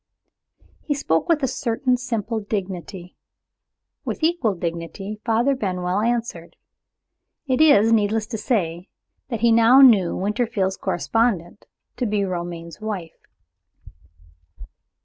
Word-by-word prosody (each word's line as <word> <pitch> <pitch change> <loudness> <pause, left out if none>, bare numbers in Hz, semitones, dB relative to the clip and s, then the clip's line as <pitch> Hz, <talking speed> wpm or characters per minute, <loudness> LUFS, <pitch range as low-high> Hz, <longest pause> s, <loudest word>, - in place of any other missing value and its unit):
He 290 - -1
spoke 165 - -1
with 310 -4 +2
a - - +3
certain 250 0 0
simple 230 -3 -3
dignity. 190 -3 -6 0.9
With - - -5
equal 315 - +1
dignity, 170 +5 -5
Father 235 +4 +2
Benwell 185 -5 -2
answered. 230 -7 -2 0.9
It 260 0 +1
is 225 -8 +5
needless 215 0 +1
to 225 - -4
say 180 - -2 0.4
that 230 -4 -4
he 235 0 +4
now 230 +4 +6
knew 210 -10 +6
Winterfield's 200 -2 -1
correspondent 205 -1 -1 0.3
to 245 - -1
be 205 -1 0
Romayne's 170 -1 -6
wife. 195 -7 -6
215 Hz, 110 wpm, -22 LUFS, 180-240 Hz, 0.9 s, now